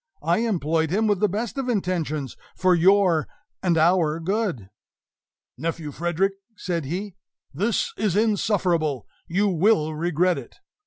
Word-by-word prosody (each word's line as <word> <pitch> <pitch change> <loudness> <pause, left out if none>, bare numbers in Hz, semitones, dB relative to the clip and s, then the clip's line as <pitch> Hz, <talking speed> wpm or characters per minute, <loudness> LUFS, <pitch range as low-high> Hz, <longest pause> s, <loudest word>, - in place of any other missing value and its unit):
I 170 +5 +2
employed 165 -8 0
him 210 +6 +1
with 205 -3 +2
the 210 - +2
best 225 +7 -3
of 260 -2 -2
intentions, 165 - -2 0.2
for 185 -1 +3
your 180 -2 +4 0.3
and 175 -3 +2
our 165 -1 +3
good!" 175 - -2 0.9
"Nephew 160 0 -3
Frederick," 175 +5 0 0.2
said 170 -5 -3
he, 190 +7 -4 0.4
"this 200 +9 0
is 205 -4 0
insufferable; 185 - +1 0.2
you 195 +4 +1
will 175 -3 +2
regret 175 +1 +1
it! 125 - -13
180 Hz, 130 wpm, -24 LUFS, 160-200 Hz, 0.9 s, your